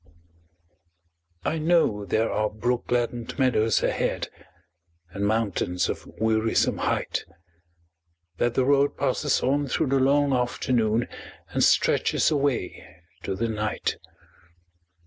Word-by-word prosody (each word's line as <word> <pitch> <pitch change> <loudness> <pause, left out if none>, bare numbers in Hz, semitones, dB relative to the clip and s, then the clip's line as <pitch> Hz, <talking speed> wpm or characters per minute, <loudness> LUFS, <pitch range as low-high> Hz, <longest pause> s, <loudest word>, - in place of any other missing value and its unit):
I 160 - 0
know 155 -11 +2
there 110 +4 0
are 105 0 0
brook 120 +3 -2
gladdened 120 -1 -2
meadows 115 -5 +2
ahead, - - -1 0.8
And 100 0 -2
mountains 100 -5 0
of - - -5
wearisome 110 0 +1
height; - - -1 1.2
That 120 0 +1
the 130 - +2
road 140 +1 +2
passes 140 +1 0
on 140 +2 +1
through 140 +2 0
the 135 0 +2
long 140 +1 +3
afternoon 120 -2 0 0.4
And - - 0
stretches - - +3
away 140 -9 -1 0.4
to 95 - -3
the 115 +4 -1
night. 105 -1 -2
120 Hz, 110 wpm, -25 LUFS, 110-140 Hz, 1.2 s, long